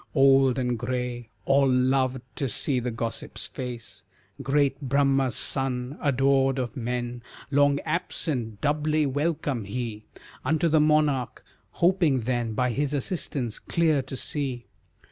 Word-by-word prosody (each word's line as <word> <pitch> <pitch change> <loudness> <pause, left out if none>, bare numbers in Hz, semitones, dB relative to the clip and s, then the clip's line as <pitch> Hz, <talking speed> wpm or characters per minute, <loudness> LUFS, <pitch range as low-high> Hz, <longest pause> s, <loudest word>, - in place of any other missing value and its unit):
Old 135 -2 +5
and 125 -2 -1
gray, 125 -1 -3 0.2
All 135 0 +4
loved 130 0 +2
to 135 -3 -1
see 130 +4 0
the 125 0 -2
gossip's 115 -2 -4
face, 125 -3 -7 0.4
Great 140 -1 +1
Brahma's 135 -1 +2
son, 130 0 -2
adored 135 -1 +2
of 120 -3 -3
men, 120 0 -3 0.3
Long 145 0 +4
absent, 145 - -2
doubly 150 +1 +1
welcome 145 -4 -1
he 110 0 -5 0.4
Unto 160 +5 +2
the 155 0 +4
monarch, 150 -4 +1 0.3
hoping 170 -7 +3
then 120 -1 -1
By 125 +1 +1
his 145 +4 -1
assistance, 135 - -2
clear 160 -4 +1
to 130 0 -7
see. 130 -5 -3
135 Hz, 125 wpm, -26 LUFS, 125-145 Hz, 0.4 s, Old